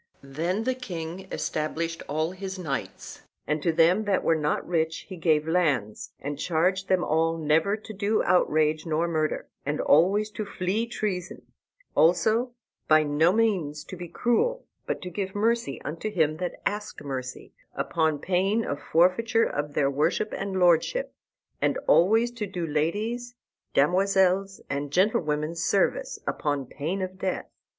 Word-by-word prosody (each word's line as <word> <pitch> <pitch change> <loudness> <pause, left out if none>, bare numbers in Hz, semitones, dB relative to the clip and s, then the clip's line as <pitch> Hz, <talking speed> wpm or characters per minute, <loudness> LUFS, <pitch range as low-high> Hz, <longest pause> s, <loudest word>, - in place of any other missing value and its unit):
Then 165 +10 -2
the 260 +2 +1
king 185 -6 -6
stablished 165 +2 -2
all 155 +3 0
his 190 0 -6
knights, 150 -7 -5 0.2
and 150 0 -1
to 165 - +2
them 175 +6 +3
that 200 -2 +1
were - - +3
not 150 -1 -1
rich 160 -2 -1
he 190 - -6
gave 160 -3 +1
lands, 150 - 0
and 145 +1 -5
charged 180 +4 +1
them 185 -2 +2
all 165 +1 +1
never 160 +6 +2
to 215 0 -10
do 205 +2 +1
outrage 155 -3 +2
nor 165 +1 0
murder, 155 -2 -1 0.2
and 145 +2 -2
always 200 +8 +3
to 215 - -4
flee 200 +3 -2
treason; 190 -5 -4 0.5
also, 220 +9 +3 0.3
by 155 0 +6
no 150 +3 +3
means 185 -9 0
to 185 - -9
be 175 -1 -7
cruel, 475 - 0 0.2
but - - -3
to 180 - -6
give 190 +2 -4
mercy 220 - 0
unto 165 +8 -4
him 160 -6 +1
that 180 0 -4
asked 205 -6 -3
mercy, 130 -3 -6 0.2
upon 160 -2 0
pain 190 +7 +1
of 145 +1 -3
forfeiture 185 +7 +3
of 145 0 -3
their 140 -1 +2
worship 155 +9 0
and 195 -1 -3
lordship; 180 - +2 0.5
and - - +2
always 225 +7 +4
to 230 -4 -4
do 180 -3 -4
ladies, 210 +11 -2 0.4
damosels, 190 +4 +2
and 145 +1 -3
gentlewomen 155 -4 +1
service, 200 - 0
upon 145 -3 -1
pain 165 +9 -3
of 185 0 -6
death. 185 -1 -2
175 Hz, 150 wpm, -26 LUFS, 155-200 Hz, 0.5 s, by